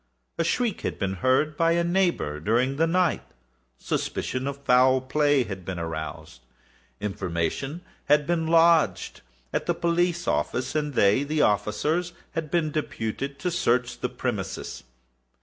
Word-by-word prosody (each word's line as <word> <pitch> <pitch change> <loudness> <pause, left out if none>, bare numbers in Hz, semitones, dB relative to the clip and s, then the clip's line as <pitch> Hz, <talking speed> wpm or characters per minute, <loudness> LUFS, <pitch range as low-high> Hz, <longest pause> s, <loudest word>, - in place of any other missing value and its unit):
A - - +3
shriek 225 +5 0
had - - -3
been 100 -2 -1
heard 135 +4 +2
by 165 +2 +3
a 170 0 +2
neighbour 170 - 0
during 120 - +1
the 165 +2 +3
night; 180 0 +2 0.6
suspicion 130 - -2
of 140 0 -5
foul 130 +1 +5
play 145 +1 +2
had 95 -4 -7
been 95 0 -5
aroused; 80 -4 -6 0.6
information 100 - -3 0.2
had 150 0 +4
been 165 -1 0
lodged 165 - +3 0.3
at - - -1
the 175 - +1
police 170 +1 0
office, 125 +1 -1
and 150 -3 -2
they 100 +6 +4
(the 150 +1 +1
officers) 150 - 0 0.2
had 160 -2 -4
been 165 -2 0
deputed 140 -2 -3
to 180 +4 -2
search 125 -8 0
the 125 - -2
premises. 120 -6 -4
140 Hz, 145 wpm, -26 LUFS, 110-165 Hz, 0.6 s, foul